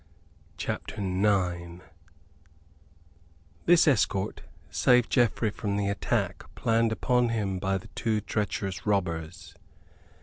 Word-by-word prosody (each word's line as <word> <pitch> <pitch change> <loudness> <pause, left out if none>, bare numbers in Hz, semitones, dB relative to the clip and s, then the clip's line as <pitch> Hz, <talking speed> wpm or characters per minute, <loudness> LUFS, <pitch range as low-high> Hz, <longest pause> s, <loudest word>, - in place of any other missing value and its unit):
CHAPTER - - -4
IX 90 -3 0 1.8
This 175 -2 +6
escort 105 -6 +1 0.3
saved 125 +8 +3
Geoffrey 115 -3 +2
from 100 -1 -3
the 100 -1 0
attack 100 -1 -1
planned 115 0 +2
upon 125 +1 +1
him 100 -5 -1
by 95 +1 0
the 95 - -11
two 110 -2 -1
treacherous 100 -2 -3
robbers. 85 -5 -2
100 Hz, 100 wpm, -28 LUFS, 95-115 Hz, 1.8 s, This